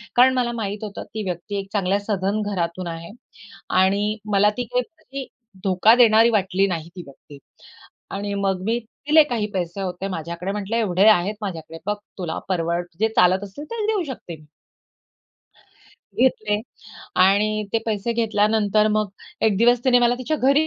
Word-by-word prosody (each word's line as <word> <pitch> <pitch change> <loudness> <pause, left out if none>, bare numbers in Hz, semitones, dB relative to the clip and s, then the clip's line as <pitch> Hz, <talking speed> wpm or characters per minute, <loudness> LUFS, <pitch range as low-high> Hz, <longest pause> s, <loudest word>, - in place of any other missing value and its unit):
कारण 255 +2 +6
मला 245 -1 +1
माहित 205 +1 -4
होतं 205 -2 -6
ती 215 -1 -3
व्यक्ती 180 +4 -4
एक 195 - -6
चांगल्या 200 0 +1
सधन 200 0 -1
घरातून 175 -1 -2
आहे 165 +2 -7 0.7
आणि 205 +3 +1 0.2
मला 205 +1 +4
ती 245 - -2
काही 250 - +2
व्यक्ती 275 -3 -9 0.4
धोका 195 +4 +5
देणारी 230 -1 +6
वाटली 195 -2 +2
नाही 170 -4 -4
ती 180 - -6
व्यक्ती. 140 +1 -15 0.7
आणि 200 +1 -4
मग 195 -2 -1
मी 230 +2 +1
दिले 295 +7 +3
काही 235 -6 -2
पैसे 180 -1 -3
होते 185 +1 -4
माझ्याकडे 170 +1 -4
म्हटलं 210 +2 -3
एवढे 200 -3 +2
आहेत 205 0 +4
माझ्याकडे 165 -5 -6
बघ, 210 - 0 0.2
तुला 175 -3 -3
परवड 170 -1 -1
जे 220 - +3
चालत 185 +2 +4
असेल 205 +9 -9
ते 435 -2 -2
देऊ 430 -3 +1
शकते 170 -8 -9
मी. 150 - -19 1.7
घेतले 215 -4 +1 0.6
आणि 210 +3 +3
ते 225 - +3
पैसे 220 +1 -1
घेतल्यानंतर 215 -1 +2
मग 215 0 +1 0.3
एक 215 -3 +3
दिवस 240 +2 +4
तिने 245 -1 +5
मला 240 0 +3
तिच्या 305 +5 -1
घरी 280 +3 +3
205 Hz, 165 wpm, -22 LUFS, 185-225 Hz, 1.7 s, कारण